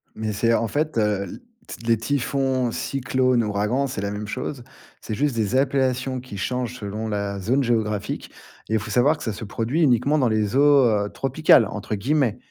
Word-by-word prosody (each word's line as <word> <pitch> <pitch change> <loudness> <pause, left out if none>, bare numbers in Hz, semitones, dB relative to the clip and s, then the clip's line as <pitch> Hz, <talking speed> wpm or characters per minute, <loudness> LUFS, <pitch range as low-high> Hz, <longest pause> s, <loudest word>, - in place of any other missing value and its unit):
Mais 110 0 -3
c'est 115 +3 +1
en 115 - +1
fait, 150 +2 -1
heu, 105 -2 +1
l - - -8 0.3
t 115 - -10
les 115 -1 +4
typhons, 130 0 0
cyclones, 130 -2 0
ouragans, 105 +6 0
c'est 125 -6 -5
la 100 0 -2
même 105 0 -5
chose. 130 +3 -5 0.4
C'est 110 - -4
juste 145 +3 0
des 110 +1 0
appellations 130 -1 +1
qui 125 -5 -9
changent 125 +3 -2
selon 105 0 -5
la 100 -2 -3
zone 125 +9 +1
géographique 110 -4 -1 0.4
et 110 - -1
il 110 - +3
faut 105 - -7
savoir 140 +6 +3
que - - -9
ça 110 - -2
se 110 - -7
produit 115 +9 -1
uniquement 140 +1 +3
dans 130 -4 +3
les 110 0 0
eaux, 145 -1 +6
heu, 105 -2 +1
tropicales 135 -2 +4
entre 105 +1 -4
guillemets. 125 +2 +1
120 Hz, 195 wpm, -23 LUFS, 105-135 Hz, 0.4 s, eaux